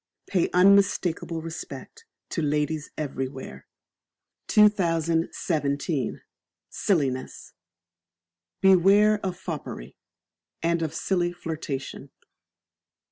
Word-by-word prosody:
Pay 180 -4 +1
unmistakable 180 -3 +3
Respect 175 - -8 0.2
to 170 - -2
ladies 150 0 -1
everywhere. 130 - -5 0.8
2017. 165 - +1 0.5
Silliness. 140 -9 -1 1.1
Beware 195 +3 +5
of 185 -2 -3
Foppery, 145 - -6 0.7
and 170 0 +1
of 160 -1 -3
silly 175 -2 0
flirtation. 155 -5 -6
165 Hz, 70 wpm, -26 LUFS, 145-185 Hz, 1.1 s, Beware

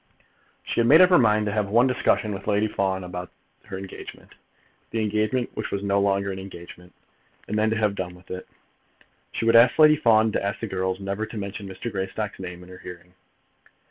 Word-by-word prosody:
She - - -2
had 115 - +3
made 150 +6 +8
up 185 0 +7
her 180 - +7
mind 105 -3 +3
to 105 - -1
have 105 -1 -1
one 120 +4 +4
discussion 120 -4 +1
with 95 0 -8
Lady 105 +1 +2
Fawn 95 -2 -1
about 90 0 -6 0.4
her 95 - -7
engagement, 95 0 -10 0.6
the 115 - -2
engagement 110 +3 0
which - - -4
was 100 0 -3
no 100 0 +1
longer 100 0 +1
an 95 - -6
engagement, 90 -1 -11 0.6
and - - -3
then 110 0 +2
to 110 - 0
have 105 -2 +1
done 90 -2 -5
with 90 +1 -16
it. 95 0 -6 0.8
She - - -3
would 115 0 +4
ask 115 +2 +6
Lady 155 -1 +7
Fawn 110 -6 +3
to - - -1
ask 100 0 -2
the - - -3
girls 95 -2 -2
never 100 +2 -3
to 110 - -8
mention 100 0 -6
Mr. 95 +5 -6
Greystock's 100 +2 -4
name 90 -1 -7
in 90 - -15
her 90 0 -11
hearing. 90 0 -11
100 Hz, 210 wpm, -24 LUFS, 95-110 Hz, 0.8 s, made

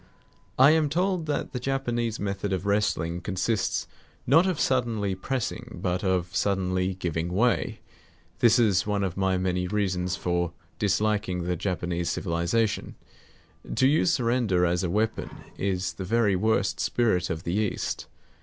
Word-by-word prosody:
I 135 +3 +7
am 155 -2 +3
told 180 +1 0
that 150 - -2
the 125 - -2
Japanese 120 -4 -1
method 100 0 -2
of 95 +1 -2
wrestling 90 -5 0
consists 100 +3 -1 0.4
not 165 +8 +5
of 180 -5 -1
suddenly 115 -6 +1
pressing, 120 +6 -4
but 90 +2 -1
of 90 -2 0
suddenly 95 -1 0
giving 85 -1 -2
way. 115 +6 +1 0.6
This 120 +1 +5
is 105 -5 +3
one 100 -1 0
of 95 -2 -2
my 95 -1 +1
many 90 -1 -1
reasons 95 -2 -1
for 85 -1 -1 0.3
disliking 105 -2 0
the 90 +1 -1
Japanese 85 -1 -2
civilization. 90 +6 -1 0.8
To 130 - +3
use 155 +4 +3
surrender 115 - +2
as 90 +1 +1
a 90 - 0
weapon 110 +5 -1 0.3
is 95 -2 -1
the 95 - -6
very 105 0 +2
worst 105 0 +1
spirit 100 -7 +1
of 80 0 -3
the 85 - -2
East. 105 0 -2
100 Hz, 145 wpm, -26 LUFS, 90-115 Hz, 0.8 s, I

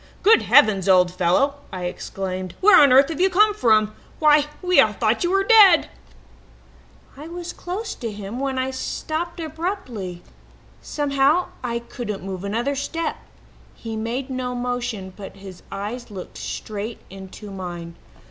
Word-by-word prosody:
"'Good 445 +3 +6
heavens, 195 -3 +4
old 180 -1 +5
fellow!' 185 +11 +1
I 185 -1 -5
exclaimed. 185 0 -5
'Where 420 +3 +7
on 285 -3 +7
earth 270 +3 +6
have 325 +1 -3
you 380 - +4
come 420 +3 +4
from? 215 - +2 0.2
Why, 300 -1 +5 0.2
we 365 0 +4
all 215 -1 +2
thought 220 +5 0
you 345 - +1
were 390 +1 +2
dead!' 400 -5 +6 1.2
"I 295 +3 -10
was 345 +1 -7
quite - - -21
close 390 +5 -4
to 230 -2 -5
him 205 +3 -7
when 270 -1 -2
I 260 0 -1
stopped 320 +6 -4
abruptly. 310 - -5 0.6
Somehow 290 +3 +1
I 235 -1 -2
couldn't 235 -4 -6
move 190 -1 -6
another 230 +7 -1
step. 325 +4 -3 0.6
He 225 -1 -7
made 240 +5 -4
no 250 -1 -3
motion, 245 -6 -4
but 195 -1 -10
his 195 -2 -11
eyes 215 +5 -5
looked 190 -3 -9
straight 215 +2 -5
into 195 +2 -10
mine. 175 -3 -7
245 Hz, 155 wpm, -22 LUFS, 195-310 Hz, 1.2 s, Where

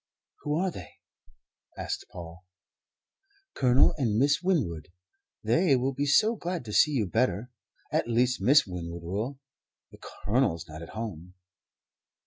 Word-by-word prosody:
"Who 150 +1 -1
are 185 +1 0
they?" 90 - -10 0.8
asked - - -4
Paul. 85 0 -10 1.1
"Colonel 125 0 +4
and 110 -6 +1
Miss 140 +5 +3
Winwood. 135 - 0 0.6
They 135 - +3
will 130 +2 0
be 140 +2 -1
so 215 +11 +4
glad 175 - -4
to 105 - -6
see 150 - +5
you 130 -8 0
better 110 +2 0 0.4
at - - 0
least 125 0 +1
Miss 135 +9 +5
Winwood 85 -2 -6
will; 105 +10 -3 0.5
the - - -15
Colonel's 100 - -1
not 75 0 -9
at 85 - -9
home." 90 -5 -6
120 Hz, 135 wpm, -28 LUFS, 90-140 Hz, 1.1 s, see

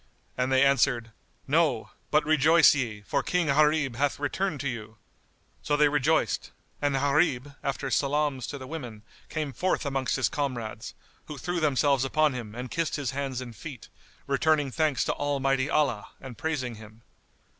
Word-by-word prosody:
and 125 +1 -1
they 130 0 +5
answered, 125 -4 +2 0.4
"No; 145 -6 +1 0.2
but 150 0 +3
rejoice 155 +1 +6
ye, 115 -7 -3
for - - 0
King 180 -1 0
Gharib 150 -3 +2
hath 140 +1 +1
returned 150 +2 -1
to 140 - -2
you." 110 -3 -6 0.6
So 145 - 0
they 150 0 +5
rejoiced, 145 +2 +1 0.3
and 145 -1 +1
Gharib, 140 -1 +1
after 135 0 -3
salams 145 -2 0
to 145 - -5
the 130 - -8
women 125 -8 -7 0.3
came 150 -4 -3
forth 180 +5 0
amongst 135 -2 -1
his 135 - +2
comrades, 120 -6 -4 0.3
who 150 - -7
threw 175 +5 -2
themselves 140 -3 +2
upon 155 +2 +2
him 115 -4 -7
and 125 +1 -6
kissed 165 -1 -1
his 140 -5 -2
hands 135 -2 -3
and 120 -3 -8
feet, 140 -4 -9 0.4
returning 145 0 +2
thanks 155 -1 +1
to - - 0
Almighty 135 -1 0
Allah 140 -10 +1
and 130 -3 -9
praising 130 -7 -3
Him. 110 +1 -15
140 Hz, 165 wpm, -27 LUFS, 125-150 Hz, 0.6 s, rejoice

